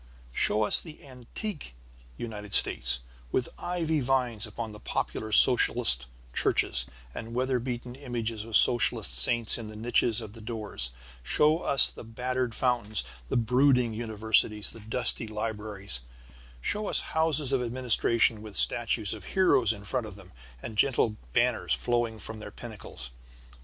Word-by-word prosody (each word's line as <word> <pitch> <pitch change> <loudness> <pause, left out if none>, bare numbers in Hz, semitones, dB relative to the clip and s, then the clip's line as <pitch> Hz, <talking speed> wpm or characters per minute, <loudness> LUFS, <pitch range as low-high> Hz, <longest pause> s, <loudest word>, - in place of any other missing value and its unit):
Show 105 - +1
us 105 - +7
the 160 -3 -13
antique 135 - -8 0.4
United 105 -3 -8
States, - - +1 0.3
with 125 - -1
ivy 165 -3 -2
vines 125 -5 +1
upon 110 +1 -7
the 105 - -12
popular 110 +1 -4
socialist 115 - +4 0.3
churches, - - +2 0.3
and 115 +1 -8
weather 130 0 -1
beaten 120 0 -6
images 115 -5 -5
of 115 -1 +2
socialist 120 - +3
saints 115 - +4
in 115 - -8
the 110 - -10
niches 115 0 +1
of 110 -3 -9
the 115 - -13
doors. 105 - -3 0.3
Show 150 - +3
us 140 -7 +6
the - - -9
battered 125 +1 -4
fountains, 115 -5 -1 0.3
the - - -1
brooding 125 0 +2
universities, 110 -1 +2
the 115 - -13
dusty 115 +1 +2
libraries. 105 - -2 0.6
Show 210 - -2
us - - +6
houses 155 -4 +1
of 130 - +1
administration 115 -2 +1
with 105 -2 -5
statues 115 -3 +2
of 105 -5 -10
heroes 140 - +3
in 105 -2 -8
front 115 +2 -4
of 105 - -10
them 105 - -15 0.3
and 110 -2 -7
gentle 120 -4 +1 0.2
banners - - 0
flowing 120 -2 -2
from 110 +1 -9
their 105 - -9
pinnacles. 100 - -10
115 Hz, 145 wpm, -27 LUFS, 105-125 Hz, 0.6 s, us